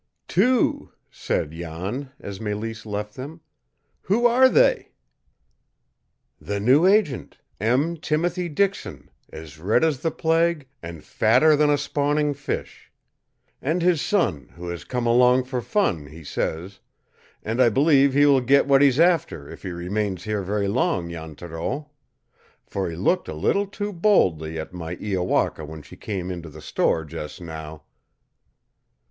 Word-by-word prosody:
"Two!" 255 -1 +1 0.2
said 75 - -2
Jan, 85 - -5
as 100 -1 -8
Mélisse 110 +1 -5
left 105 0 -4
them. 145 +7 -9 0.6
"Who 230 +5 +1
are 255 +2 +6
they?" - - +2 1.5
"The 100 0 -4
new 135 - +4
agent, 195 - +1 0.2
M. 130 - +1
Timothy 170 +3 -1
Dixon, 195 +6 -2 0.2
as 80 -1 -10
red 105 - +2
as 155 -5 +1
the 165 - 0
plague, 165 -2 +1
and 85 -2 -9
fatter 130 +8 +4
than 150 0 +3
a 145 - +3
spawning 145 +1 0
fish! 145 +1 -6 0.7
And 165 +5 -1
his 175 -4 +3
son, 110 - 0
who 85 +1 -7
has 85 -1 -6
come 125 -1 -3
along 125 +2 +4
for 125 -1 -4
fun, 110 - 0
he 80 +3 -12
says; 85 +6 -4 0.6
and 115 +4 -1
I 120 - +6
believe 140 +2 +4
he 145 +1 +5
will 140 -2 +5
get 140 +3 +4
what 140 -1 +4
he's 140 -1 +4
after 165 - +2
if - - -11
he 95 - -5
remains 90 +2 -3
here 105 -1 -2
very 100 +1 -1
long, 95 -5 0
Jan 80 -2 -8
Thoreau, 90 - -5 0.7
for 95 -3 -3
he 80 - -6
looked 175 - 0
a 80 - -5
little 200 - +1
too 205 +1 -5
boldly 85 - +2
at 80 - -7
my 85 -1 -5
Iowaka 90 -5 -1
when 80 0 -9
she 75 - -13
came 95 -4 -5
into 85 -2 -7
the 80 +1 -12
store 80 +1 0
just 75 0 -7
now!" 80 -3 -8
115 Hz, 150 wpm, -23 LUFS, -, 1.5 s, are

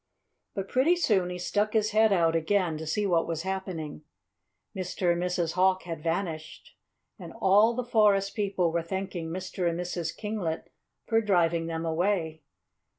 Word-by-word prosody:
But 195 -2 -3
pretty 275 - +3
soon 200 - +2
he 180 - -4
stuck 205 +4 -1
his 215 -1 +2
head 220 0 +4
out 165 -4 +3
again 170 0 +1
to 160 - -6
see 205 +7 0
what 170 -4 +2
was 165 -1 -3
happening. 185 -6 -4 0.7
Mr. 180 -1 -1
and 170 - -3
Mrs. 180 -2 0
Hawk 185 +1 +2
had 165 -3 -6
vanished. 165 -1 -4 0.4
And - - -9
all 210 +5 +5
the 250 0 -2
forest 205 -4 +3
people 195 -5 0
were 170 +1 0
thanking 185 -1 -4
Mr. 180 0 -2
and 170 +1 -3
Mrs. 175 -2 -3
Kinglet 205 -7 -4 0.3
for 225 -1 +2
driving 170 -5 +2
them 165 0 -3
away. 165 -1 0
180 Hz, 160 wpm, -28 LUFS, 165-205 Hz, 0.7 s, all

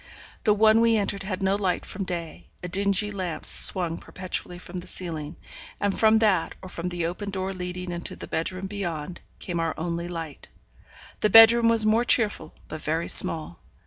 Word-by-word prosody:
The 210 -2 +4
one 220 +1 +5
we 230 -1 +4
entered 200 -1 -2
had 195 0 -4
no 190 +1 +2
light 190 -3 -1
from 195 0 -5
day; 165 - -6 0.2
a - - -3
dingy 200 +2 +1
lamp 185 -5 -5
swung 175 -3 +2
perpetually 180 -1 -5
from 180 +1 -9
the 180 +1 -7
ceiling, 160 -4 -4 0.4
and 200 -1 0
from 220 0 +5
that, 205 -6 +1
or 185 - -8
from 170 0 -5
the 175 -2 -3
open 185 +4 -4
door 190 0 -3
leading 180 0 -5
into 175 0 -5
the - - -8
bedroom 185 +3 -3
beyond, 175 -4 -5 0.2
came 175 -2 -4
our 165 -1 -1
only 170 +1 -3
light. 165 -4 -7 0.7
The 215 - +2
bedroom 225 +2 +8
was 230 -1 +3
more 220 +2 +3
cheerful, 210 -10 +1
but 155 - -7
very 160 +2 -2
small. 155 - +3
185 Hz, 180 wpm, -25 LUFS, 170-205 Hz, 0.7 s, bedroom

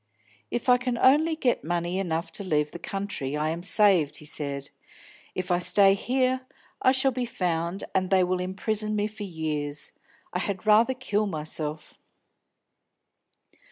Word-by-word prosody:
"If 240 - -3
I 250 0 +6
can 250 -1 -2
only 305 +6 +4
get 255 -6 0
money 175 +2 -1
enough 170 -2 -2
to 200 - -2
leave 150 -5 0
the 175 - -8
country, 170 -7 -3
I 155 +1 0
am 170 +1 -4
saved," 185 -6 +3
he 150 - -11
said. 140 -2 -5 0.6
"If 185 -1 -3
I 175 - +3
stay 195 +2 +5
here, 255 +4 0 0.4
I 255 - +5
shall 265 0 +3
be 250 0 -2
found, 175 -4 -2
and 185 -1 +1
they 190 -1 +4
will 180 0 0
imprison 210 +3 -1
me 205 0 +1
for 215 0 -7
years. 155 -5 -3 0.4
I 180 - 0
had 195 +1 -3
rather 225 +5 +5
kill 215 -5 -1
myself!" 155 -2 -5
190 Hz, 160 wpm, -26 LUFS, 160-215 Hz, 0.6 s, I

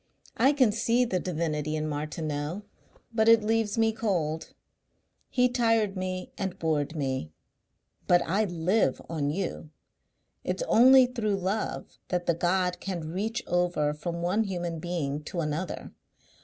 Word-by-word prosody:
I 260 +5 +5
can 260 -6 +4
see 230 +3 +2
the 185 -6 -1
divinity 155 -4 -2
in 155 0 -2
Martineau 155 +3 -3 0.5
but 220 0 +3
it 230 -1 +6
leaves 225 0 0
me 225 0 +3
cold. 170 -8 -2 0.7
He 250 0 +3
tired 225 -5 +1
me 185 -1 -4
and 190 -2 -3
bored 155 -1 -1
me.... 130 - -2 0.8
But 175 0 +5
I 215 +3 +1
live 175 -3 +1
on 150 -4 -1
you. 170 -1 -3 0.7
It's - - -2
only 260 - +7
through 230 -5 -1
love 195 +3 -3
that 180 -1 -1
the 170 - +3
God 180 +2 0
can 170 -5 -4
reach 220 +6 -2
over 175 -4 +1
from 170 +3 -4
one 200 +6 +1
human 175 -4 -3
being 155 -4 -2
to 175 - -4
another. 155 +2 -3
180 Hz, 140 wpm, -28 LUFS, 160-220 Hz, 0.8 s, only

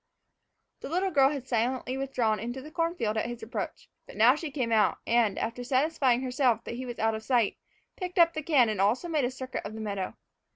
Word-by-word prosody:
The - - -7
little 370 +4 0
girl 275 -3 +5
had 275 -3 -5
silently 250 +1 -1
withdrawn 250 -6 0
into 240 +5 -4
the 300 +4 -10
corn 335 +1 -1
field 220 -8 -1
at 220 - 0
his 240 -1 -7
approach, 220 -3 -5 0.2
but - - -12
now 230 +4 +7
she 310 +2 -5
came 255 -5 -2
out 220 -2 +3
and, 230 -4 +2
after 235 +2 -3
satisfying 260 -1 +2
herself 250 -3 +1
that - - -6
he 255 +2 -5
was 240 - -6
out 225 0 +1
of 220 - -4
sight, 235 -2 +1 0.4
picked 365 0 -5
up 335 -1 +6
the 310 - -3
can 285 -6 +4
and 210 -3 -1
also 225 - +2
made 305 -6 +1
a - - 0
circuit 260 0 -6
of 205 +2 -7
the - - -7
meadow. 200 -3 -3
250 Hz, 225 wpm, -28 LUFS, 225-280 Hz, 0.4 s, now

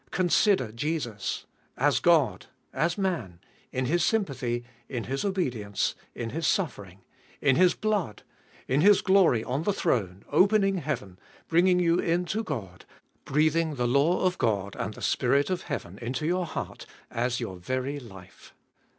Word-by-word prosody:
Consider 185 - +2
Jesus! 120 -4 -3 0.3
As 135 -1 +3
God! 165 -5 +3 0.3
As 165 +3 0
Man! 170 - -2 0.3
In 130 0 -1
His 170 +5 +1
sympathy! 135 - 0 0.3
In 120 -4 -3
His 135 +2 -3
obedience! 125 - -1 0.2
In 115 -1 -4
His 160 +4 -1
suffering! 100 - -2 0.4
In 135 -3 +3
His 180 +3 +4
blood! 205 - -1 0.4
In 135 +3 +2
His 205 +2 +6
glory 190 - +4
on 130 +4 -2
the 205 - +1
throne; 100 - -1
opening 195 +3 +4
heaven; 120 - -4 0.3
bringing 180 +2 +4
you 175 -1 +3
in 175 +2 +1
to 215 +5 -2
God; 105 - -6 0.4
breathing 155 +2 +2
the 125 -2 0
law 140 +8 +3
of 180 -1 0
God 100 -3 0
and 105 +1 -4
the - - -10
Spirit 140 +6 +2
of 180 -1 -1
heaven 100 - -6
into 125 +5 -3
your 180 +1 0
heart, - - -6 0.2
as 120 +1 -1
your 95 -7 -5
very 130 +9 -3
life 95 -8 -14
145 Hz, 150 wpm, -27 LUFS, 120-175 Hz, 0.4 s, His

